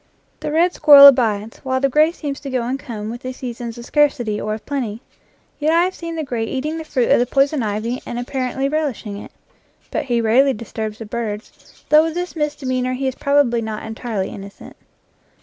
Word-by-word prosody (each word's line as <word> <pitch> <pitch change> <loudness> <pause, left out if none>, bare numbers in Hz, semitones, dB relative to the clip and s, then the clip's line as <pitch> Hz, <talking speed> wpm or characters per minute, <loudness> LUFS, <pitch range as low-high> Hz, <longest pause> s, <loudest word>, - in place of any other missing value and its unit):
The - - -4
red 345 +3 +3
squirrel 285 -2 +9
abides, 225 -5 +4
while 260 -1 -1
the 275 - +2
gray 305 +4 +3
seems 290 -5 -5
to 280 - -7
go 255 -2 -1
and 255 +3 -2
come 220 -6 -6
with 240 +1 -8
the 255 - -5
seasons 240 -2 -6
of 235 - -9
scarcity 250 -8 +1
or 215 0 -2
of 220 - -12
plenty. 250 -5 -4 0.6
Yet 310 +2 +2
I 340 +1 +4
have 370 +1 -1
seen 335 -2 -6
the 320 - -2
gray 245 -5 -3
eating 290 +7 -3
the - - -5
fruit 255 -6 0
of - - +5
the 245 - +1
poison 275 +2 +2
ivy 220 +3 -2
and 240 - -6
apparently 255 +2 -2
relish 295 -5 -2
ing 200 -1 -5
it. - - -10 0.6
But - - -2
he 240 -3 0
rarely 250 +5 +3
disturbs 220 -1 -6
the 225 - -8
birds, 215 -1 -7
though 305 +1 +6
of 325 - -5
this 355 0 -4
misdemeanor 260 -5 -1
he 265 +1 -2
is 260 - -1
probably 280 -4 +2
not 220 -1 -5
entirely 220 -3 -4
innocent. 200 0 -11
255 Hz, 210 wpm, -20 LUFS, 225-290 Hz, 0.6 s, squirrel